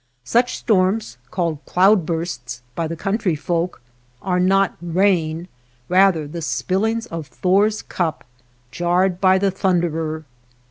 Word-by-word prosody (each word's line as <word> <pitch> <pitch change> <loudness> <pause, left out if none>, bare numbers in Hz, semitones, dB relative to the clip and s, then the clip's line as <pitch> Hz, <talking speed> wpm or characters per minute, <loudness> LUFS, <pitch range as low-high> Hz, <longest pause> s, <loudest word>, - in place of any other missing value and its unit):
Such 245 - +1
storms, 190 - +1
called 170 -5 -2
cloud 190 -1 +4
bursts 125 -8 -4
by 165 +4 -2
the 165 - -4
country 195 0 -1
folk, 170 -1 -2 0.4
are 180 +4 -1
not 195 +1 +3
rain, 175 -2 +1 0.4
rather 185 -4 +4
the 170 +3 -6
spillings 190 - -1
of 165 - -6
Thor's 205 +4 +1
cup, 170 -4 -2 0.5
jarred 175 +4 +1
by 190 -1 +5
the 195 0 +1
Thunderer. 165 -4 -1
180 Hz, 125 wpm, -21 LUFS, 160-195 Hz, 0.5 s, by